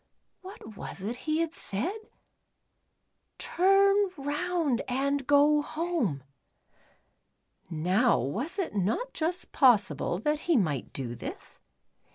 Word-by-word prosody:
\\'hat 370 - -11
was 195 - -8
it 225 +4 -3
he 310 +5 -1
had 330 -1 -2
said? 335 - 0 0.6
" - - -50
Tuni 395 +2 +3
roitud 290 -1 -1
and 275 +2 0
eo 295 +1 +5
home." 300 - -2 1.5
Now 185 +9 +2
was 235 - -3
it 380 -4 -2
not 215 - -1
just 345 +3 -2
possible 205 - +3
that 300 +9 -1
he 330 - +5
might 150 - -1
do 125 -3 -5
this? - - -8
285 Hz, 115 wpm, -28 LUFS, 200-340 Hz, 1.5 s, eo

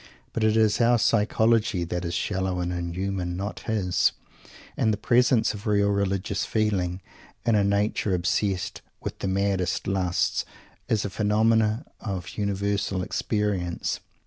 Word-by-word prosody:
But 115 - -1
it 110 0 +3
is 110 +1 +3
our 120 +1 +5
psychology 110 -3 +2
that 90 +1 -3
is 85 -1 -3
shallow 95 0 -1
and 90 0 -2
inhuman, 90 +1 -3
not 100 +2 -4
his, 100 -5 +2 0.6
and 110 - +2
the 105 - 0
presence 120 +1 +3
of 105 0 -7
real 100 -1 +3
religious 100 0 0
feeling 95 -5 0 0.4
in 115 - +3
a 105 -1 +4
nature 100 -1 +1
obsessed 90 +1 -1 0.2
with - - -5
the - - -2
maddest 95 -1 0
lusts 95 -2 0 0.4
is 105 -2 +1
a 100 - -3
phenomenon 110 +3 +2
of 95 -5 -5
universal 100 -1 -1
experience. 100 -5 -1
100 Hz, 140 wpm, -26 LUFS, 90-110 Hz, 0.6 s, our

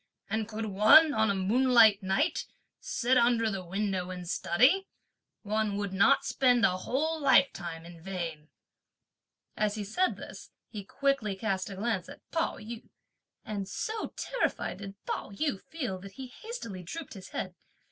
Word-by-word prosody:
and 220 0 -1
could 220 0 -4
one, 215 +10 +6
on 220 -3 +2
a 200 - +1
moonlight 225 +1 +5
night, 190 0 0 0.3
sit 255 +2 +1
under 235 -2 +3
the 195 -2 -4
window 190 0 -2
and 180 -1 -6
study, 255 - +3 0.6
one 210 -1 0
would 200 -2 -3
not 235 +8 +4
spend 245 -3 +3
a 185 - +2
whole 315 +11 -1
lifetime 175 - +2
in 170 -1 -12
vain!" 165 -4 -5 1.1
As 210 -1 0
he 215 - -3
said 360 - 0
this, - - -10 0.2
he 210 -3 -6
quickly 255 -2 0
cast 195 -2 -2
a 195 - -7
glance 200 -3 -2
at - - -13
Pao 325 -1 -1
yü, 220 +2 -9 0.6
and 200 -3 -4
so 440 0 -3
terrified - - -2
did 200 -1 -8
Pao - - -3
yü 200 0 -2
feel 250 - -4
that 195 +1 -11
he 265 - -7 0.2
hastily 230 - -6
drooped 305 - -7
his 190 -3 -10
head. 185 - -4
215 Hz, 155 wpm, -30 LUFS, 190-255 Hz, 1.1 s, one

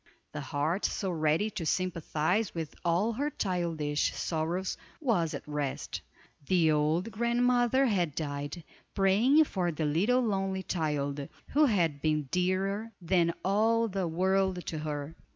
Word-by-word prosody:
The - - -5
heart 155 +7 -1
so 190 -2 -1
ready 160 +6 +1
to 200 -5 -4
sympathize 180 +3 0
with 160 -2 -4
all 180 +7 +2
her 285 +6 -1
childish 165 - -1
sorrows 170 +3 -2 0.2
was 205 - +1
at - - -6
rest. 145 -2 -3 0.5
The 170 -4 +4
old 155 +8 +1
grandmother 245 +3 +2
had 180 - +1
died, 145 +2 -4 0.3
praying 215 +10 +5
for 185 - -1
the 155 0 -2
little 200 +13 +2
lonely 195 -4 -1
child, 145 -5 -2 0.2
who 300 +1 +4
had 170 - +1
been 155 -1 +1
dearer 195 +5 0
than 170 -1 +2
all 225 +4 +3
the 195 -3 -2
world 190 +2 +1
to 160 - -4
her. 150 0 -4
180 Hz, 135 wpm, -30 LUFS, 155-210 Hz, 0.5 s, praying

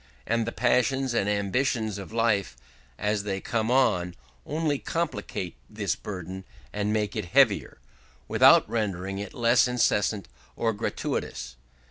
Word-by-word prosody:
And 115 0 0
the - - -1
passions 125 +2 +1
and 105 -3 +1
ambitions 105 +1 0
of 100 - -9
life, 110 - +1 0.4
as 105 0 0
they 100 -1 -3
come 110 +2 -1
on, 90 -9 +2 0.3
only 150 -2 0
complicate 105 - -3
this 105 -4 -2
burden 95 -1 -7 0.3
and 105 0 -1
make 105 -1 -1
it 105 -4 -2
heavier, 85 - +3 0.5
without - - +6
rendering 95 -3 -2
it 100 -1 -7
less 120 +1 +4
incessant 110 -4 +1 0.3
or 115 -1 0
gratuitous. 65 -10 -3
105 Hz, 130 wpm, -27 LUFS, 100-120 Hz, 0.5 s, without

